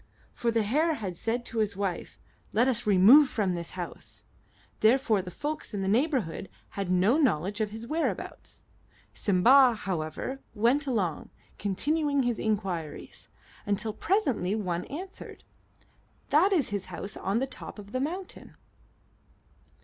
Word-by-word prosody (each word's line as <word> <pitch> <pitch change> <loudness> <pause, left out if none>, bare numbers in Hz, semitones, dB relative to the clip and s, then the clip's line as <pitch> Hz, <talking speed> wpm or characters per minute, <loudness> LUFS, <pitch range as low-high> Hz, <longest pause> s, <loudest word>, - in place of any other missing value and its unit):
For 240 - -1
the 225 -1 +2
hare 305 +9 +1
had 195 -8 -5
said 235 +6 -2
to 230 - -4
his 210 -2 0
wife, 195 -4 -3 0.4
"Let 235 +4 +3
us 240 -3 -1
remove 220 +9 +7
from 205 -7 0
this 170 +1 -6
house." 175 -2 -8 0.6
Therefore 225 -2 +3
the 180 - -8
folks 295 - -5
in 195 - -2
that 190 - 0
neighborhood 235 - 0 0.2
had 195 -2 -4
no 190 - +3
knowledge 205 - +1
of 215 - 0
his 220 +2 -8
whereabouts. 315 +6 -4 0.5
Simba, 240 +6 +5
however, 190 +6 -4 0.2
went 245 +7 +2
along, 190 - -1 0.3
continuing 285 - +1
his 240 -2 -1
inquiries, 190 -8 -3 0.4
until 205 +2 -1
presently 255 - 0
one 180 -5 -2
answered, 370 +7 -8 0.9
"That 330 +8 +4
is 330 -9 +2
his 200 -2 -3
house 200 - -6
on 195 +3 -1
the 260 - +1
top 265 - -9
of 205 -1 -11
the 255 - -1
mountain." 355 +7 -5
220 Hz, 140 wpm, -28 LUFS, 195-270 Hz, 0.9 s, remove